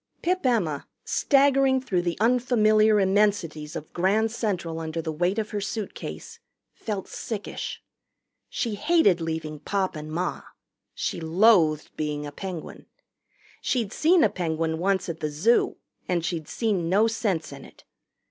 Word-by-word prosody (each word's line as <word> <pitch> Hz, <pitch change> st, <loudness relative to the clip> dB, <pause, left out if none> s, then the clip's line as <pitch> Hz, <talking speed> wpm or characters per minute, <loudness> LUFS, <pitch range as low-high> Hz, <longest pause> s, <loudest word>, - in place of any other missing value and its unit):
Pip 365 Hz, +2 st, 0 dB
Emma, 195 Hz, -, 0 dB, 0.2 s
staggering 275 Hz, -2 st, +3 dB
through 190 Hz, -9 st, -1 dB
the 175 Hz, -1 st, -2 dB
unfamiliar 220 Hz, -3 st, +4 dB
immensities 190 Hz, -6 st, +1 dB
of 150 Hz, -, -7 dB
Grand 210 Hz, +5 st, +2 dB
Central 180 Hz, -8 st, -2 dB
under 160 Hz, 0 st, -4 dB
the 160 Hz, -1 st, -3 dB
weight 175 Hz, +6 st, 0 dB
of 220 Hz, -1 st, -2 dB
her 205 Hz, -2 st, -2 dB
suitcase, 225 Hz, -, -6 dB, 0.3 s
felt 205 Hz, -4 st, -5 dB
sickish. 215 Hz, -3 st, -5 dB, 0.7 s
She 230 Hz, -4 st, -2 dB
hated 205 Hz, -, +3 dB
leaving 160 Hz, -2 st, -4 dB
Pop 190 Hz, +4 st, -1 dB
and 155 Hz, 0 st, -7 dB
Ma. 175 Hz, +3 st, -2 dB, 0.5 s
She 175 Hz, -, -3 dB
loathed 165 Hz, -2 st, +3 dB
being 150 Hz, -1 st, -2 dB
a 145 Hz, -, -6 dB
Penguin. 180 Hz, +1 st, -7 dB, 0.7 s
She'd 235 Hz, -5 st, -1 dB
seen 330 Hz, +2 st, +4 dB
a -, -, +5 dB
penguin 160 Hz, -2 st, -2 dB
once 190 Hz, +1 st, +1 dB
at 165 Hz, -2 st, -5 dB
the 155 Hz, -, -2 dB
zoo, 180 Hz, +12 st, +2 dB, 0.3 s
and 175 Hz, -2 st, 0 dB
she'd 165 Hz, -4 st, -3 dB
seen 200 Hz, -8 st, -1 dB
no 205 Hz, +5 st, +4 dB
sense 210 Hz, -9 st, -1 dB
in 140 Hz, -1 st, -10 dB
it. -, -, -16 dB
190 Hz, 145 wpm, -25 LUFS, 160-225 Hz, 0.7 s, a